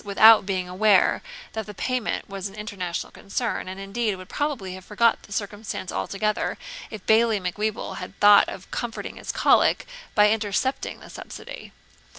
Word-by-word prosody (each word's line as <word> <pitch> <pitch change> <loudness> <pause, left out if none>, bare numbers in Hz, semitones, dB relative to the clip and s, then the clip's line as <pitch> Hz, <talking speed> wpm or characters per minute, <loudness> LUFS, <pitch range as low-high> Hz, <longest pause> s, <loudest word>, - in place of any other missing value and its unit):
without 210 0 +7
being 185 -2 -1
aware 195 +2 +3 0.3
that 220 -1 -4
the 210 - -9
payment 255 +2 -2
was 195 0 -5
an 195 - -14
international 200 -5 -4
concern, 225 +1 -3
and, 190 +1 -6
indeed, 205 +2 -1
would 185 0 -11
probably 270 -11 -2
have 185 0 -9
forgot 225 +4 +2
the - - -17
circumstance 205 -2 -4
altogether, 210 +2 -1 0.3
if 215 -4 -9
Bailie 220 -1 +4
Macwheeble 210 +4 -3
had 195 - -8
thought 205 0 +7
of 190 - -9
comforting 240 -2 -4
his - - -4
cholic - - +3 0.3
by 210 0 +6
intercepting 225 +5 -1
the - - -12
subsidy. - - -9
210 Hz, 160 wpm, -25 LUFS, 195-220 Hz, 0.3 s, without